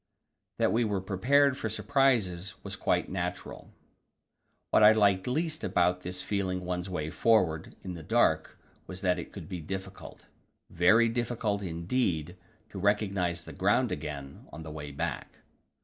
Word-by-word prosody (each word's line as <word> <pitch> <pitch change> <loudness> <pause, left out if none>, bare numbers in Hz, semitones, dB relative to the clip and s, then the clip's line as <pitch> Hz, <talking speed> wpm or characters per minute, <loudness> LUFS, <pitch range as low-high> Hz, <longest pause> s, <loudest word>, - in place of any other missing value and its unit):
That - - +2
we 120 +2 +3
were 105 -3 0
prepared 130 +9 +3
for 110 - -2
surprises 110 -8 +1
was - - -5
perhaps - - -18
quite - - +1
natural. 90 -1 -5 1.0
What - - +5
I 105 +1 +9
liked 100 -2 +3
least 155 +4 -1
about 90 +1 +1
this 90 0 -5
feeling 95 -3 -2
one's 90 +1 -3
way 80 -4 -3
forward 90 -9 +2
in 95 - -5
the 85 - -8
dark - - +1 0.3
was 90 0 -8
that 90 -2 +1
it 85 - -9
would - - -8
be 90 -3 -5
difficult 95 +3 -8 0.5
very 105 +7 +5
difficult 115 -3 -1
indeed 85 -1 -1 0.4
to 100 - -6
recognize 95 -4 0
the - - -10
ground - - +2
again 70 -2 -6
on 80 +3 -8
the 80 - -8
way 75 -1 -7
back. 70 - -4
95 Hz, 155 wpm, -29 LUFS, 85-110 Hz, 1.0 s, I